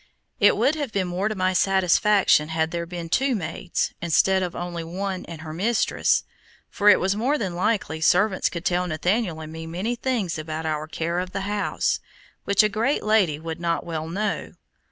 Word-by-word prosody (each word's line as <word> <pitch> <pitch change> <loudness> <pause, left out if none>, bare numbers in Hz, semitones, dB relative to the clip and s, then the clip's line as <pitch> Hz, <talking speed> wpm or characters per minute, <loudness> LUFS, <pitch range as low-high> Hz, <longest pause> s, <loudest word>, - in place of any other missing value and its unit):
It - - +5
would 285 - +3
have 290 -6 -3
been 195 -3 -1
more 180 +4 -1
to 215 - -2
my 185 -1 +1
satisfaction 190 -3 +3
had 160 0 0
there 170 -1 -3
been 170 -1 -6
two 260 +9 +1
maids, 175 -1 -2
instead 190 +3 +3
of 180 -2 -3
only 175 -1 -4
one 185 +3 -4
and 165 -2 -8
her 155 -1 -7
mistress, 220 +8 +1 0.5
for 210 -1 +4
it - - +7
was 190 +1 +1
more 255 +8 +1
than 190 -8 -3
likely 175 -4 -1
servants 190 +4 +3
could 170 -1 -6
tell 180 0 +1
Nathaniel 180 +2 0
and 155 0 -8
me 160 0 -7
many 190 +9 -2
things 230 -10 -2
about 155 +1 -5
our 155 -1 -2
care 170 +3 -2
of 185 0 -5
the 195 - -2
house, 205 +1 -1 0.5
which 200 +2 +4
a - - +4
great 225 +7 0
lady 210 -8 +3
would 165 +1 -6
not 170 -1 -1
well 160 -2 -4
know. 200 +4 -3
180 Hz, 195 wpm, -24 LUFS, 165-210 Hz, 0.5 s, it